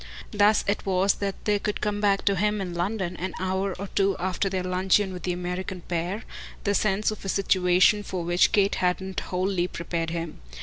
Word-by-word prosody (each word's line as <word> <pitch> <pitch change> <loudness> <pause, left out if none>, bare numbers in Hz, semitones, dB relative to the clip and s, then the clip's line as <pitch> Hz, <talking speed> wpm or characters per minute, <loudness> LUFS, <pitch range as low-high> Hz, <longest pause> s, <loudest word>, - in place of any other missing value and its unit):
Thus 205 +1 +4
it 200 - 0
was 190 0 +2
that 200 -1 -5
there 210 -1 +2
could 210 0 -2
come 205 -1 -1
back 200 -1 +2
to 200 - +3
him 210 +2 +1
in 185 -3 -4
London, 180 +1 -2
an 185 0 -4
hour 190 +1 -1
or 200 - -5
two 195 -1 +2
after 185 +2 -1
their 185 -1 -2
luncheon 185 +2 +2
with 180 - -7
the 180 - -1
American 180 +1 -4
pair, 175 +5 -3 0.4
the 200 - +1
sense 210 +1 +1
of 215 - -8
a 195 - -4
situation 185 +1 +3
for 185 -3 -4
which 175 +2 +3
Kate 200 -2 +3
hadn't 185 +1 0
wholly 185 -1 -1
prepared 170 -1 -3
him. 165 -1 -5
190 Hz, 200 wpm, -26 LUFS, 180-200 Hz, 0.4 s, Thus